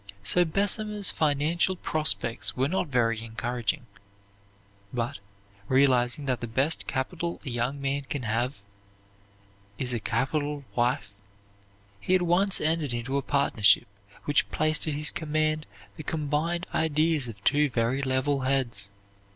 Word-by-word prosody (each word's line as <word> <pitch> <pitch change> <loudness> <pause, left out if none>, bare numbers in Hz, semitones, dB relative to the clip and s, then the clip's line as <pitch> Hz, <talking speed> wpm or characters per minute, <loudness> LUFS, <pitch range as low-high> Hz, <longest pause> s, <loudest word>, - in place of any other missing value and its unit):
So 175 - +3
Bessemer's 205 +3 0
financial 155 +5 +1
prospects 155 -10 0
were 130 +2 +2
not 180 +2 -1
very 115 -4 +1
encouraging; 115 0 -2 1.1
but, 120 -4 -3 0.5
realizing 130 0 +3
that 130 -3 0
the 120 - -3
best 135 +8 0
capital 170 +6 -2
a - - -2
young 120 +4 -1
man 140 +1 -1
can 140 -3 -3
have 115 0 -1 1.1
is 125 +2 -2
a 120 - -1
capital 145 +6 -1
wife, 120 -4 0 0.9
he 185 - +2
at 185 - +2
once 180 +3 +3
entered 155 -5 0
into 120 +3 -3
a 140 - +2
partnership 135 -8 +3 0.4
which 145 - +2
placed 155 +1 0
at 150 - -1
his 150 -1 +4
command 155 -2 -1 0.3
the - - -5
combined 160 +4 -1
ideas 155 -3 +2
of 100 -3 -9
two 145 +3 +3
very 120 +2 0
level 135 +1 +1
heads. 130 -7 0
140 Hz, 135 wpm, -27 LUFS, 120-155 Hz, 1.1 s, his